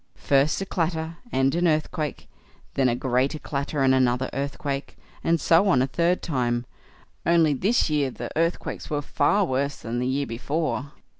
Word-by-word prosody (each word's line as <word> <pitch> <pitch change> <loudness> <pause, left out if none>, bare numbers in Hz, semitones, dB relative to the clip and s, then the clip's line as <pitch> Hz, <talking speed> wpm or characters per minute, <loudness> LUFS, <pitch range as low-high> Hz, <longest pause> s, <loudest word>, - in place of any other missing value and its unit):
First 140 +2 +2
a - - -2
clatter 165 -2 -2
and 135 +1 +2
an 175 +1 +2
earthquake, 155 -1 -1 0.5
then 130 -2 +2
a 120 - +1
greater 130 +4 0
clatter 140 -1 -2
and 130 0 +5
another 130 0 +2
earthquake, 140 0 -4 0.3
and 165 0 +2
so 170 +6 +4
on 130 -9 +4
a - - +2
third 170 +6 0
time; 120 -5 -1 0.6
only 165 -3 +4
this 200 - +2
year 150 -4 +1
the - - -7
earthquakes 165 +2 -1
were 145 -2 -1
far 195 +9 +2
worse 140 -1 -1
than 120 +1 -4
the 125 - -1
year 140 +2 0
before. 140 +4 -2
145 Hz, 165 wpm, -25 LUFS, 130-165 Hz, 0.6 s, and